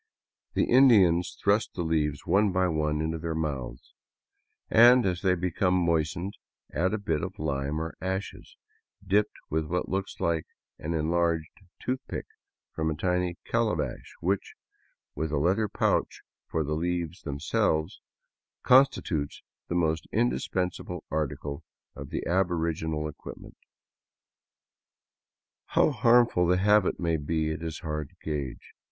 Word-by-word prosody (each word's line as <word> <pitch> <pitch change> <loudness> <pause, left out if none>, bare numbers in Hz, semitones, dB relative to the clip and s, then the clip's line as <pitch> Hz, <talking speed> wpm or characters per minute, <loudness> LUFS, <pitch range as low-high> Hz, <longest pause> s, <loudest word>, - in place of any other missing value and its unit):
The - - +3
Indians 100 -10 +5
thrust 105 +2 +2
the 85 - -2
leaves 75 -3 0
one 100 0 +3
by 95 0 +2
one 75 -2 0
into 80 +1 -2
their 80 0 -3
mouths, 70 -6 -4 0.7
and 120 +2 +7
as 90 -2 0
they 90 -1 +3
become 90 +1 0
moistened, 85 +2 0 0.4
add 95 +6 +1
a - - -1
bit 80 -7 -1
of - - -5
lime 70 0 -2
or 80 +1 -4
ashes, 95 +2 -5 0.5
dipped 105 +2 +1
with 80 0 0
what 90 +3 -2
looks 95 0 -3
like 85 -2 0 0.3
an 80 +2 -3
enlarged 80 0 0 0.3
toothpick 130 +1 -4 0.5
from 80 0 -1
a 80 - -2
tiny 90 +1 0
calabash 115 -2 -1
which, 95 +3 -1 0.6
with 80 -1 -3
a 75 - 0
leather 95 +9 +2
pouch - - 0 0.2
for 80 - -1
the 75 +1 -2
leaves 85 +2 -2
themselves, 80 +4 -1 0.6
constitutes 110 - +3 0.2
the 85 - -2
most 80 -2 0
indispensable 90 +7 -1
article 75 -2 -3 0.3
of - - -8
the - - -3
aboriginal 80 -4 0
equipment 75 - -10 2.1
How - - +3
harmful 115 -7 +4
the 90 +1 +3
habit 105 +1 +3
may 85 -2 +1
be, 80 +1 -1
it 80 - -5
is 80 -2 -5
hard 75 -3 -4
to - - -27
gage. 75 -4 -5
85 Hz, 135 wpm, -28 LUFS, 80-95 Hz, 2.1 s, and